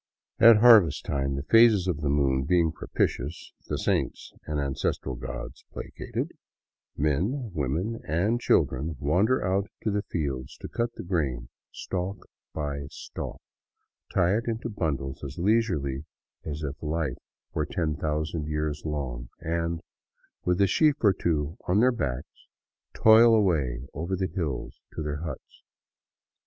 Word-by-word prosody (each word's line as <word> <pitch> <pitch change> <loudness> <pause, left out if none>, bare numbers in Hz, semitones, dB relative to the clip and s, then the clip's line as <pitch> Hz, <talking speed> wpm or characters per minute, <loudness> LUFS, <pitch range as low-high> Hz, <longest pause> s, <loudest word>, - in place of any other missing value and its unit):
At 115 -1 +9
harvest 105 - +6
time, 70 -1 -1
the 70 - -3
phases 115 +1 +6
of 80 -5 -1
the 75 - 0
moon 70 -2 +2
being 85 0 +3
propitious, 75 0 -2
the - - -1
saints - - -1
and 75 -1 -1
ancestral 70 -1 -2
gods 60 0 -7
placated, - - -5 0.7
men, 100 - 0
women, 80 - -2
and 100 +10 +1
children 75 - +2
wander 95 - +2
out 95 +2 0
to 110 - +1
the 105 0 0
fields 70 -9 -4
to - - -5
cut 120 0 -2
the - - -7
grain 75 -9 -1 0.2
stalk 95 +2 -4 0.3
by 70 -2 -4
stalk, - - -7 0.7
tie 90 +1 +3
it 115 +2 -1
into 115 0 -2
bundles 70 - -3
as 70 0 -6
leisurely 80 - +1 0.4
as 75 0 -5
if 70 +1 -5
life 75 -4 -2 0.3
were 75 - -1
ten 80 -1 -1
thousand 75 +1 -2
years 75 -1 -2
long, 65 -6 -4
and, 85 0 -2 0.6
with 90 +1 +1
a - - +7
sheaf 150 - +4
or 100 -3 +6
two 80 -1 -1
on 90 +3 +3
their 125 +3 +5
backs, 70 - -4 0.5
toil 115 +1 +7
away 75 - +1
over 85 +6 -2
the 95 -3 -2
hills 80 -8 -3
to - - -3
their 75 0 -2
huts. 80 -5 -8
80 Hz, 145 wpm, -27 LUFS, 70-100 Hz, 0.7 s, At